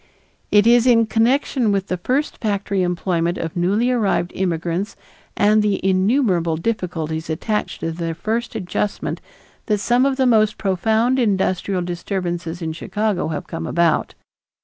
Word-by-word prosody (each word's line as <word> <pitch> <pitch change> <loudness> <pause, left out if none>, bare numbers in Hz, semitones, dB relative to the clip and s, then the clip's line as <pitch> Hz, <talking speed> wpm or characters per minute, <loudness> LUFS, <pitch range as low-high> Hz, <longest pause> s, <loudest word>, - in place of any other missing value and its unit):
It 205 0 +5
is 240 +1 +5
in 230 -2 +5
connection 235 +1 +1
with 195 -1 0
the 185 - -2
first 265 +11 -1
factory 200 -3 -1
employment 175 -1 0
of 165 -1 -4
newly 200 +8 +1
arrived 205 -7 0
immigrants 175 +1 -2 0.4
and 210 +1 +4
the 210 -2 +1
innumerable 185 - +2
difficulties 165 -5 -3
attached 210 +7 -2
to 165 - -2
their 165 0 -4
first 225 +7 -3
adjustment 200 0 -3 0.5
that 210 - +2
some 245 +5 +2
of 275 - 0
the 265 - +2
most 215 -3 +3
profound 220 +6 +1
industrial 190 -4 0
disturbances 175 -1 -4
in 160 -1 -3
Chicago 210 +3 -2
have 160 +2 -4
come 165 -1 -5
about. 170 -2 +1
195 Hz, 145 wpm, -20 LUFS, 175-225 Hz, 0.5 s, It